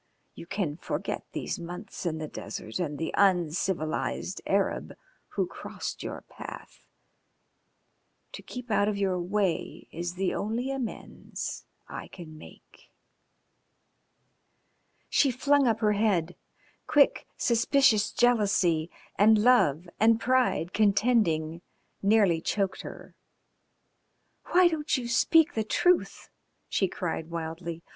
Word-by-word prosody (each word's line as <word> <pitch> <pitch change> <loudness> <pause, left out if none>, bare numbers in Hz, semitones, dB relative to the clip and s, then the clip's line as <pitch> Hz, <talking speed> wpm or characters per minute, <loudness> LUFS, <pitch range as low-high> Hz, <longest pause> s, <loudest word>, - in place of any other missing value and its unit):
You 170 - -11
can 175 -6 -2
forget - - -4
these - - -4
months 180 +2 -7
in 160 -1 -2
the 155 -1 -5
desert 110 -4 -6
and 150 -5 -2
the 160 - -3
uncivilised 180 -2 0
Arab 195 0 0 0.4
who - - +1
crossed - - -7
your - - -6
path. - - -11 1.4
To - - -8
keep 250 -2 -8
out 205 -1 +3
of 210 -1 -1
your 190 -2 0
way 185 -1 -2
is 175 +1 -5
the 190 0 -1
only 235 +6 -2
amends 260 -4 -6 0.2
I - - -7
can 165 -4 -11
make." 155 - -16 2.2
She 280 - +3
flung 280 +2 +3
up 225 -1 +1
her 210 -1 +3
head. 190 -5 +1 0.5
Quick, 295 -2 +3
suspicious 235 -3 +3
jealousy 200 -9 +2 0.3
and 215 +2 +6
love 210 - +3
and 225 +1 +4
pride 250 -9 +1
contending 200 -7 +2 0.4
nearly 200 -5 +3
choked 195 +1 -1
her. - - -10 1.3
"Why 360 0 +5
don't 315 -3 0
you 245 -2 -4
speak 325 +6 +4
the 220 - 0
truth?" 355 +11 +1 0.4
she 195 - +1
cried 170 -3 -4
wildly. 165 0 -5
200 Hz, 115 wpm, -28 LUFS, 170-235 Hz, 2.2 s, and